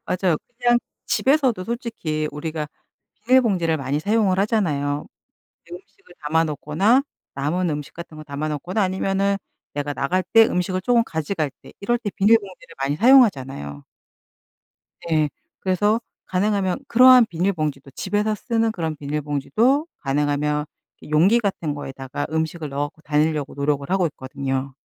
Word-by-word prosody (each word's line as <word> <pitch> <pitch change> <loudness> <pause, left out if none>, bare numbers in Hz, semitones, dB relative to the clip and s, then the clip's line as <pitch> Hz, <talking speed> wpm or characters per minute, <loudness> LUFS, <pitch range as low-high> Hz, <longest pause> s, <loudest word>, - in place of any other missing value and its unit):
맞아요. 180 -3 +1 0.2
그냥 240 -1 +4 0.3
집에서도 260 -8 +2
솔직히 225 - -3
우리가 155 0 -4 0.6
비닐봉지를 205 -11 +3
많이 140 +1 -2
사용을 205 0 +2
하잖아요. 150 -9 0 0.7
음식을 180 0 -13
담아 160 +2 +2
놓거나 160 - +2 0.3
남은 165 +6 0
음식 150 -2 -5
같은 170 -2 -10
거 155 - -8
담아 145 +1 -4
놓거나 175 +8 -2
아니면은 195 +1 0 0.4
내가 145 0 -3
나갈 185 +8 0
때 225 +3 +6
음식을 185 -1 -1
쪼금 235 +3 +3
가져갈 160 -3 -2
때 - - -14
이럴 240 +4 +1
때 230 -3 -4
비닐봉지를 200 -5 +1
많이 140 +1 0
사용하잖아요. 135 - +3 1.3
예. 155 -2 +3 0.3
그래서 205 +4 +1 0.3
가능하면 195 +1 0
그러한 250 0 +7
비닐봉지도 160 -7 -2
집에서 210 +7 -1
쓰는 225 +1 0
그런 160 -6 -3
비닐봉지도 150 - 0
가능하면 145 +1 0 0.4
이 - - -13
용기 185 +10 +4
같은 180 -8 -2
거에다가 135 0 -5
음식을 160 0 -2
넣어 140 +1 -1
갖고 155 - -24
다니려고 150 -1 0
노력을 140 0 -1
하고 190 -2 +2
있거든요. 135 -2 -4
165 Hz, 345 characters per minute, -22 LUFS, 145-205 Hz, 1.3 s, 그러한